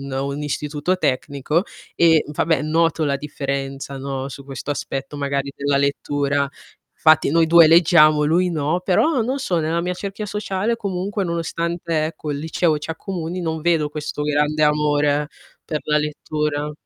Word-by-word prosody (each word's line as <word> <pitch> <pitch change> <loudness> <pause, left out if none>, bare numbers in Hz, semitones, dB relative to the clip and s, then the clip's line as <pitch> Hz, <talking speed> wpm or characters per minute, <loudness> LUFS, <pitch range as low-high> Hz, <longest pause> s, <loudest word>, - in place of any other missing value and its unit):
un 140 0 -7
un 140 +2 -3
istituto 150 +4 -2
tecnico 140 +1 0 0.3
e, 160 -2 +4
vabbè, 150 0 0
noto 160 +1 +1
la 140 -2 +1
differenza, 140 -1 -4
no, 135 0 -4
su 140 +1 -10
questo 135 +1 -5
aspetto 135 0 -5
magari 140 -1 -2
della 140 0 0
lettura. 140 0 0 0.6
Infatti 155 -3 +5
noi 165 +1 +3
due 170 0 +7
leggiamo, 155 -2 +6
lui 175 +4 +2
no, 160 +2 0
però 240 - +2
non 260 +5 -2
so, 185 -10 -1
nella 165 +1 0
mia 180 +1 -2
cerchia 200 +3 -5
sociale 210 +2 -2
comunque 200 -1 -3
nonostante, 170 -1 -2
ecco, 155 -1 -6
il 140 - -4
liceo 160 +1 0
ci 150 - -6
accomuni, 175 +1 -4
non 160 -2 -2
vedo 165 -2 +1
questo 150 0 -5
grande 150 +1 +1
amore 150 -1 +2 0.4
per 155 -1 -3
la 150 0 +2
lettura. 150 0 -2
150 Hz, 155 wpm, -21 LUFS, 145-170 Hz, 0.6 s, due